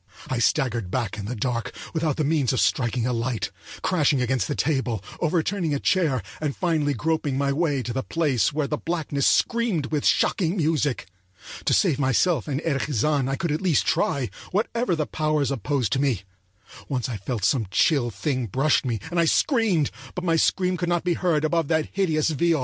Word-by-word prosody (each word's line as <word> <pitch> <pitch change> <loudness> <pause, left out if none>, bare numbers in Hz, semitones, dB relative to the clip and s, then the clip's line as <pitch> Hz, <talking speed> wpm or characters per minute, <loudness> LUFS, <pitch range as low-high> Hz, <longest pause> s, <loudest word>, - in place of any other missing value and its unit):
I 130 - -1
staggered 120 - +1
back 110 -2 -2
in 100 - -5
the 125 +4 -4
dark, 120 +1 -2 0.2
without 160 -3 0
the 155 - +1
means 145 -4 +1
of 130 - 0
striking 120 -2 +1
a 125 - 0
light, 115 -3 -2 0.3
crashing 150 -6 +2
against 125 0 0
the 145 - -2
table, 130 -8 -1 0.2
overturning 165 0 0
a - - -1
chair, 155 -10 +1 0.2
and 150 -3 -1
finally 155 -5 0
groping 150 0 -1
my 140 0 +1
way 145 -4 0
to 120 - -4
the 130 - -1
place 145 -6 +1
where 150 0 -1
the 150 +1 -3
blackness 155 -5 -1
screamed 225 - +1
with 150 -2 0
shocking 180 -1 +2
music. 150 -5 0 0.6
To - - +2
save 160 -8 +2
myself 135 - +2
and 140 -2 -1
Erich 140 -5 0
Zann 140 +2 +1
I 135 - 0
could 165 +3 -2
at 150 - -1
least 180 -6 +2
try, 135 -4 0 0.2
whatever 225 0 0
the 155 -2 -1
powers 155 -2 0
opposed 135 -3 -1
to 135 - +1
me. 125 -10 0 0.7
Once 125 -4 -1
I 120 -4 -4
thought 105 +1 -3
some 115 -1 +1
chill 130 - +2
thing 130 +1 -2
brushed 135 +9 +2
me, 120 -5 -2
and 175 - 0
I 170 - +4
screamed, 200 - +2 0.2
but 180 - -4
my 165 -2 +2
scream 180 +2 +2
could 175 0 -2
not 175 -1 +1
be 175 -1 +1
heard 165 -3 +1
above 165 -1 +1
that 160 -1 0
hideous 160 -5 +1
viol. 165 +2 +2
145 Hz, 195 wpm, -24 LUFS, 130-165 Hz, 0.7 s, I